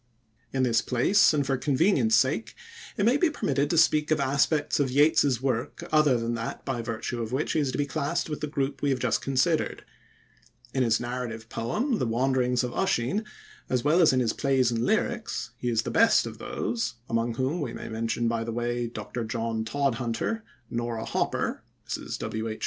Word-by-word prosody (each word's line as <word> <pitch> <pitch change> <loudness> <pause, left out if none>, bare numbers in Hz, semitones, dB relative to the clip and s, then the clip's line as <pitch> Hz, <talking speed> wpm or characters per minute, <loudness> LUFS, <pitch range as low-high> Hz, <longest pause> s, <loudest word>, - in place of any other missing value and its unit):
In 130 -1 0
this 115 -3 +3
place, 155 - +4
and 145 -3 +1
for 135 0 0
convenience 135 - +3
sake, 130 - +1 0.4
it 200 - +2
may 245 +5 +4
be 345 +2 +3
permitted 145 - 0
to 170 - +1
speak 155 -1 +4
of 155 0 +2
aspects 140 +3 +1
of 140 -2 +2
Yeats's 140 -2 +3
work 125 -3 -2
other 150 -5 +4
than 115 0 -2
that 115 0 -5
by 130 -4 -2
virtue 115 +1 -4
of 115 0 -4
which 135 +4 -1
he - - +1
is 140 -3 0
to - - -4
be 145 - +1
classed 145 0 -2
with 150 -1 -5
the 150 - -1
group 140 -2 -2
we 145 - +1
have 135 - +1
just 120 -3 0
considered. 140 +5 0 0.9
In 130 - +1
his 115 -3 +3
narrative 120 -2 -5
poem, 220 - -1
"The 125 - 0
Wanderings 125 +1 +1
of 125 - -2
Usheen", 190 - 0 0.4
as 125 -2 0
well 155 +5 +4
as 165 - +6
in 130 -1 +2
his 115 -2 +1
plays 130 -4 +2
and 115 0 -1
lyrics, 220 - -1
he 125 - -1
is 115 -2 +2
of - - -12
the - - -4
best - - +4
of - - -8
those 115 0 -3
among 115 0 0
them 130 +8 -1
we 130 -5 -3
may - - -7
mention 115 +1 -1
by 115 0 0
the 115 - -4
way 120 +1 -2
Dr. 120 +1 -5
John 115 0 -2
Todhunter, 125 - -1 0.3
Nora 115 -1 -3
Hopper - - -1 0.3
(Mrs. - - -4
W.H. 110 0 -4
130 Hz, 200 wpm, -27 LUFS, 115-145 Hz, 0.9 s, as